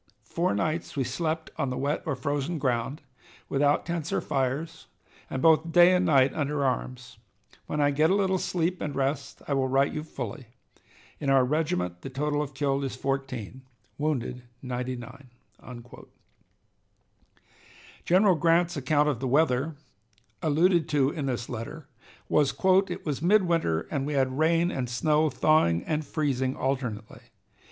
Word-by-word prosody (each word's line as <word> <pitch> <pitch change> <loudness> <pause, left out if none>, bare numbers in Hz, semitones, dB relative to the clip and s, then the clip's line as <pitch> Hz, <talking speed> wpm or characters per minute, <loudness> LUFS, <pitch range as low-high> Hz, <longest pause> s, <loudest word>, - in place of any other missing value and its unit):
Four 170 +10 -1
nights 160 -1 -2
we 135 - +2
slept 160 +5 -3
on 140 -3 0
the 125 - -3
wet 145 +3 -1
or 150 - 0
frozen 140 +5 -2
ground, 130 +2 -2 0.5
without 145 +1 +2
tents 170 -2 -3
or - - +1
fires, 140 +3 -2 0.4
and 130 - -3
both 160 0 +4
day 175 +2 +7
and 180 0 +2
night 135 -4 +4
under 145 -1 -1
arms. 125 -1 -3 0.5
When 150 - -3
I 145 0 +3
get 155 +3 +3
a 190 - +3
little 190 -2 +1
sleep 175 +1 -1
and 145 - -3
rest 140 +1 -2
I 145 - 0
will 135 -1 +1
write 135 +2 +2
you 150 - -3
fully. 150 -4 -7 0.7
In 140 - -2
our 135 -2 +5
regiment 145 - -1
the - - -6
total 145 +2 -1
of 145 -2 -6
killed 140 0 0
is 135 -2 -3
14; 130 -3 -4 0.4
wounded, 130 -4 -2 0.2
99." 125 +1 -5 2.8
General 185 +1 +4
Grant's 170 +2 +2
account 145 +1 +2
of 140 -6 0
the 130 - -2
weather, 145 +2 +2 0.7
alluded 165 +1 +2
to 145 -2 +2
in 145 -4 -4
this 120 -3 -3
letter, 140 +6 -7 0.4
was: 145 -2 +2 0.3
"It - - -6
was 145 -3 -2
midwinter, 170 - +2
and 140 -2 -1
we 150 - -2
had 130 0 0
rain 165 +2 +3
and 125 -2 -3
snow, 150 +5 +2
thawing 130 - +2
and 155 -1 -1
freezing 135 -3 -1
alternately. 125 -5 -3
145 Hz, 150 wpm, -27 LUFS, 130-160 Hz, 2.8 s, day